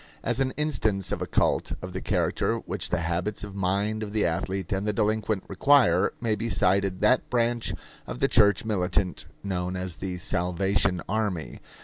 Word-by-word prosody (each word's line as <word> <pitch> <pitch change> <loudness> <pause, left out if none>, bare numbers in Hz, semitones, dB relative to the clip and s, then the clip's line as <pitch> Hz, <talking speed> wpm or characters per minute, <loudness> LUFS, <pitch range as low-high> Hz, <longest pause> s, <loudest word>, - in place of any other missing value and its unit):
As 120 +1 0
an 135 -1 +2
instance 110 - 0
of - - -2
a - - -2
cult - - +1
of 95 0 -7
the 95 - -4
character - - 0
which - - -4
the 90 - 0
habits 85 +6 -2
of 105 -1 -7
mind 100 +3 0
of 105 -1 -5
the 110 - +2
athlete 95 +2 -2
and 95 +2 -1
the 105 - +1
delinquent 110 -1 0
require, 100 -4 +4
may 115 -2 0
be 115 +3 -2
cited 95 -1 +2
that 125 +5 +3
branch 120 -1 0 0.3
of - - -5
the - - +2
church 105 0 +4
militant 90 -6 -1 0.2
known 90 -2 -2
as 90 -3 -3
the 90 +1 -4
Salvation 90 0 0
Army. 100 -6 -2
100 Hz, 175 wpm, -26 LUFS, 90-110 Hz, 0.3 s, require